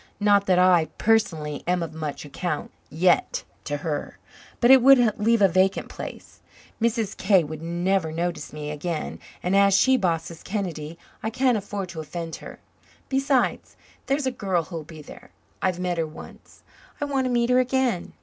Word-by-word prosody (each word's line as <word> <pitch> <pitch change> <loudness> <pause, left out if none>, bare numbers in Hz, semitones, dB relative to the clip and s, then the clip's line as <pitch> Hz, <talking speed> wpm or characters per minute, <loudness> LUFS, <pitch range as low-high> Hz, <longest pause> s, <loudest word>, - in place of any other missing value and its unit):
Not 205 -1 +3
that 185 -1 +4
I, 180 -3 +5
personally, 160 -10 +1
am 180 -1 +1
of 160 -1 -6
much 155 -2 -5
account 155 +2 -4 0.2
yet 175 +3 +2 0.2
to 145 -1 -2
her. 150 -3 -3 0.4
But 240 +1 +5
it 265 -1 +8
would 245 -5 +5
leave 225 0 +3
a - - +8
vacant 185 +2 +1
place. - - -9 0.4
Mrs. 230 -3 0
K. 190 -3 +3
would 155 0 -7
never 175 0 0
notice 170 -1 -3
me 150 0 -6
again 155 +1 -4 0.2
and, 180 +2 +1
as 200 -1 +5
she 260 0 +4
bosses 170 -5 -2
Kennedy, 170 -6 -4 0.2
I 220 - -2
can't 250 +1 +2
afford 200 -2 -4
to 170 -2 -7
offend 165 +1 -6
her. - - -10 0.5
Besides, 270 -2 0 0.3
there's 275 +1 0
a 260 - +1
girl 190 -8 -1
who'll 165 0 -6
be 155 0 -12
there. - - -13 0.3
I've 185 -1 0
met 180 -2 -1
her 160 - 0
once. 155 - -13 0.4
I 290 - -1
want 275 -2 0
to - - 0
meet 240 0 +1
her 250 - +5
again. 255 -6 0
185 Hz, 175 wpm, -24 LUFS, 165-230 Hz, 0.5 s, it